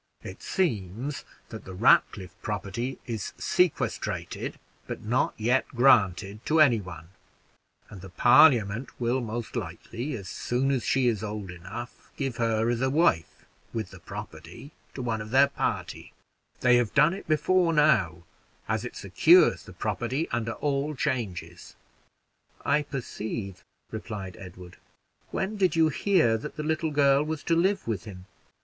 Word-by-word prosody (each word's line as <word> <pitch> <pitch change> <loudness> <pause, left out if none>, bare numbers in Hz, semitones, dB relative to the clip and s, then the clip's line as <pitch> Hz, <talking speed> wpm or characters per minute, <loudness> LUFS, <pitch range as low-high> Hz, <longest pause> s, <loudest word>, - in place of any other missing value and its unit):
It - - -9
seems 125 - -2 0.3
that 110 - -8
the 95 - -9
Ratcliffe 95 -3 +3
property 105 +5 -4
is 115 -6 -5
sequestrated, 180 -4 -1 0.3
but - - -6
not 120 +4 0
yet 120 +4 +1
granted 105 -4 +3
to 160 +1 +3
any 125 -8 +5
one; 85 -3 -10 0.8
and 100 -3 -11
the 95 - -10
Parliament 120 - +5
will 120 +2 0
most 115 0 -5
likely, 125 +6 -5
as 100 -5 -8
soon 125 +7 -1
as 130 -4 0
she 130 +3 +2
is 110 -4 0
old 105 -3 -5
enough, 95 +8 -9
give 135 -4 -3
her 115 -1 +1
as 120 0 -2
a 130 - +2
wife, 135 - +1 0.3
with 110 -2 -4
the 95 - -12
property, 95 - -9 0.2
to 130 - -4
one 115 -3 -2
of 110 - -8
their 135 +4 +5
party; - - -4 0.5
they 125 -1 +5
have 120 -4 -1
done 150 +4 +5
it 195 - -8
before 170 +3 +2
now, 110 - +2 0.4
as - - -1
it - - -7
secures - - +4
the - - -11
property 130 +7 -2
under 115 -1 -2
all 145 +1 -1
changes." 95 - -4 0.9
"I 150 - +3
perceive," 110 -8 -6 0.3
replied 105 -4 -6
Edward. 90 -1 -11 0.5
"When 200 +3 -3
did 185 -4 +2
you 160 -1 +4
hear 155 - +2
that 150 - -8
the 155 - -3
little 160 +1 -1
girl 140 -1 +4
was 155 0 -4
to 165 - +1
live 190 - +1
with 105 -6 -3
him?" 95 -4 -10
120 Hz, 150 wpm, -27 LUFS, 100-145 Hz, 0.9 s, any